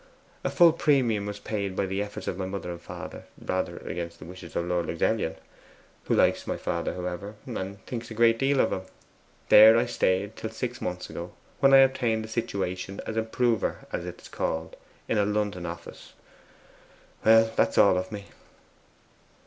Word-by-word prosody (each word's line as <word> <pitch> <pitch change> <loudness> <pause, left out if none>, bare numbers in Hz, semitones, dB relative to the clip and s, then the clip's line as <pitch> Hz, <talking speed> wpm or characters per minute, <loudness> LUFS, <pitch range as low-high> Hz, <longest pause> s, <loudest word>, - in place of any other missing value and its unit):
A - - 0
full 170 -3 +6
premium 125 -11 +2
was 105 0 -5
paid 100 -2 -3
by 100 - 0
the 95 +1 -2
efforts 105 0 -6
of - - -1
my 95 0 -3
mother 95 -2 -5
and 85 0 -8
father, - - -8
rather 85 -2 -2
against 85 0 -5
the 75 - -11
wishes 90 0 -11
of 85 - 0
Lord 90 -2 -1
Luxellian, 85 -1 0 0.7
who - - +1
likes - - +2
my - - -2
father, - - -2
however, 90 +3 -5
and 100 -5 -6
thinks 120 -2 -5
a 115 - -7
great 115 0 +4
deal 135 0 +2
of - - +1
him. 95 - -2 0.7
There 110 +2 +9
I 120 - +3
stayed 100 -3 0
till 110 - -5
six 120 +2 -5
months 90 0 -4
ago, 85 +1 -7 0.3
when 135 - +5
I 135 - +9
obtained 120 -4 -1
a - - -9
situation 100 -4 -3
as 110 - -4
improver, 115 0 0
as - - -3
it - - -7
is - - -13
called, 80 0 -3 0.3
in 110 - +1
a - - +4
London 105 -4 -1
office. 85 0 -9 1.1
That's 110 0 +4
all - - +6
of 95 0 -6
me. 100 -2 -6
100 Hz, 180 wpm, -27 LUFS, 90-115 Hz, 1.1 s, There